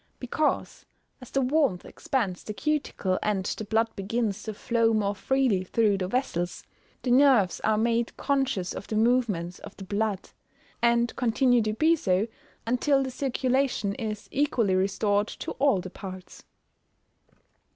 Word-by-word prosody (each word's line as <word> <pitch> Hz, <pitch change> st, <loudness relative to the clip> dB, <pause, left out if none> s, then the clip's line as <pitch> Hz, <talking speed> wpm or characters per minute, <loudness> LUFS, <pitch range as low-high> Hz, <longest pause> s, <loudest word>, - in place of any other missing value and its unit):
_ -, -, -42 dB
Because, 295 Hz, +5 st, -1 dB, 0.4 s
as 255 Hz, -, -11 dB
the 275 Hz, -, 0 dB
warmth 265 Hz, -, +1 dB
expands 205 Hz, -10 st, -2 dB
the 215 Hz, -, -6 dB
cuticle, 285 Hz, -11 st, -1 dB
and 200 Hz, -3 st, 0 dB
the 215 Hz, -, -3 dB
blood 225 Hz, +2 st, 0 dB
begins 205 Hz, +1 st, -2 dB
to 220 Hz, -, -5 dB
flow 230 Hz, 0 st, +1 dB
more 205 Hz, -1 st, +1 dB
freely 235 Hz, -2 st, +1 dB
through 205 Hz, +1 st, +1 dB
the 185 Hz, -, -1 dB
vessels, 180 Hz, -7 st, -2 dB, 0.4 s
the 250 Hz, -, 0 dB
nerves 250 Hz, -8 st, +4 dB
are 215 Hz, -1 st, +1 dB
made 230 Hz, +1 st, 0 dB
conscious 270 Hz, -10 st, 0 dB
of -, -, -7 dB
the 215 Hz, -, -3 dB
movements 215 Hz, -7 st, +1 dB
of -, -, -11 dB
the 195 Hz, -, -8 dB
blood, 200 Hz, 0 st, -2 dB, 0.5 s
and 235 Hz, 0 st, +2 dB
continue 245 Hz, 0 st, +3 dB
to 215 Hz, 0 st, -1 dB
be 315 Hz, +9 st, +3 dB
so 190 Hz, -, +1 dB, 0.4 s
until 270 Hz, +4 st, +2 dB
the 260 Hz, -, -4 dB
circulation 260 Hz, -5 st, 0 dB
is 215 Hz, -1 st, -5 dB
equally 255 Hz, -8 st, +1 dB
restored 200 Hz, +2 st, +1 dB
to -, -, -6 dB
all 275 Hz, -8 st, +3 dB
the 180 Hz, 0 st, -7 dB
parts. 185 Hz, -2 st, -10 dB
225 Hz, 150 wpm, -27 LUFS, 200-255 Hz, 0.5 s, nerves